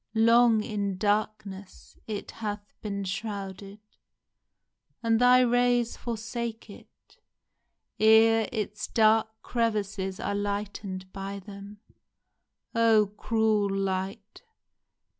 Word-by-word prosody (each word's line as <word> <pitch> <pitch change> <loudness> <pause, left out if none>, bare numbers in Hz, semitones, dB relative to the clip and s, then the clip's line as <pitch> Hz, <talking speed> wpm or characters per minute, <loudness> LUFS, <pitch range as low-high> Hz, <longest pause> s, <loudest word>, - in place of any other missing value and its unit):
Long 230 0 +5
in 200 -4 -3
darkness 205 -1 -3
It 210 -2 -5
hath 205 -2 -6
been 200 -2 -4
shrouded, 195 0 -6 1.2
and 225 0 +2
thy 250 +1 +6
rays 245 -1 +2
forsake 230 -1 -5
it - - -18 0.8
*Ere 220 0 +5
its 210 -1 -4
dark 220 0 +4 0.2
crevices 210 -5 -2
are - - -2
lighten'd 200 -2 -4
by 195 0 -5
them. 200 +1 -11 0.9
Oh, 220 -3 +3
cruel 215 -2 +1
Light 195 +2 -3
210 Hz, 90 wpm, -27 LUFS, 200-225 Hz, 1.2 s, thy